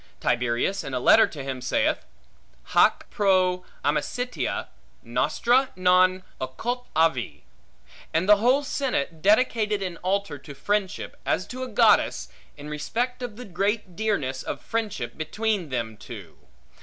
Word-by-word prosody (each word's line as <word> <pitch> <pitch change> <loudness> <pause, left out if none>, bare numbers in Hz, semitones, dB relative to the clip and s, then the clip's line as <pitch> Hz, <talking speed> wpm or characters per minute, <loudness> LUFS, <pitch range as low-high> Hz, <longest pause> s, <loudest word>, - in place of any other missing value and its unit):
Tiberius 125 +10 0
in 135 - -5
a - - 0
letter 220 - +6
to 145 -4 -8
him 135 -2 -4
saith, 125 - 0 0.7
Haec - - +5
pro 185 -3 +2 0.2
amicitia 155 - -1 0.3
nostra 255 +2 +2
non 185 0 +4 0.2
occultavi; 160 - -1 0.7
and 165 +4 +1
the 210 0 +7
whole 250 +7 +3
senate 245 - -2
dedicated 215 -1 +2
an 180 -3 -4
altar 185 -5 -2
to 140 0 -11
Friendship, 205 +5 -2
as 185 - 0
to 255 +1 -7
a 255 - -3
goddess, 65 - +3 0.3
in 145 0 -9
respect 235 +12 -2
of 245 -4 -5
the 250 +2 -8
great 195 0 -2
dearness 155 -12 -1
of - - -5
friendship, 220 -6 -4
between 200 +2 -1
them 115 -4 -3
two. 105 -4 -10
185 Hz, 130 wpm, -25 LUFS, 145-220 Hz, 0.7 s, the